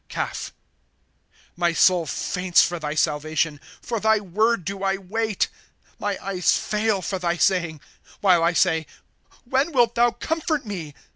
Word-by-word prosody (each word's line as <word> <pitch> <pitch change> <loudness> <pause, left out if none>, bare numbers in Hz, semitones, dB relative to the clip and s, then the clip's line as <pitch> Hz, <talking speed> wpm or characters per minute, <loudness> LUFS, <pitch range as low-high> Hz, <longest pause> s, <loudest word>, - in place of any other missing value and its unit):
Caph. - - -4 0.5
' - - -44 0.3
My 175 -1 +1
soul 175 -1 +4
faints 180 +2 +2
for 175 -1 -2
thy 150 -1 -4
salvation; 155 0 0 0.2
For 230 -2 -2
thy 220 0 +3
word 210 +1 0
do 195 +1 -4
I 195 0 +1
wait. 215 +2 -1 0.3
' - - -35
My 205 -1 -2
eyes 185 -3 +2
fail 210 -2 -1
for 190 +1 -3
thy 175 -1 -1
saying, 170 -5 +1 0.4
While 180 -4 +4
I 170 +1 +3
say: 160 -3 +2 0.6
When 265 +6 +1
wilt 240 -3 +3
thou 240 0 +4
comfort 310 +4 -2
me 170 -8 -6
190 Hz, 155 wpm, -23 LUFS, 170-220 Hz, 0.6 s, soul